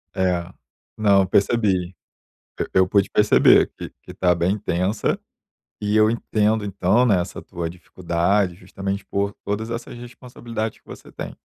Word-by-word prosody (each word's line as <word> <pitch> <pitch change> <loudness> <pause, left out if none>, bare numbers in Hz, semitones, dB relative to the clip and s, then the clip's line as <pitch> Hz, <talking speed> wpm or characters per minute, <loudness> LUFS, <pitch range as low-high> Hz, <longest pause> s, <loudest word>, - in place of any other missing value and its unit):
É. 90 -2 +1 0.5
Não, 100 -2 +4
eu 95 - 0
percebi, 95 -3 +1 0.6
e - - 0
eu 95 0 +5
pude 100 +1 +2
perceber 105 0 +5
que - - -7
que - - -10
está 90 -1 +1
bem 85 +2 +1
intensa, 95 0 -1 0.6
e 105 +1 0
eu 110 0 +5
entendo, 110 -2 0
então, 100 +5 +2
né, 100 -6 +3
essa 90 - -7
tua 85 -1 -5
dificuldade, 90 +2 -1
justamente 95 +2 -5
por 100 0 -2
todas 105 +3 -3
essas 120 +1 -6
responsabilidades 120 -2 -6
que - - -43
você - - -12
tem. - - -7
100 Hz, 150 wpm, -22 LUFS, 90-110 Hz, 0.6 s, eu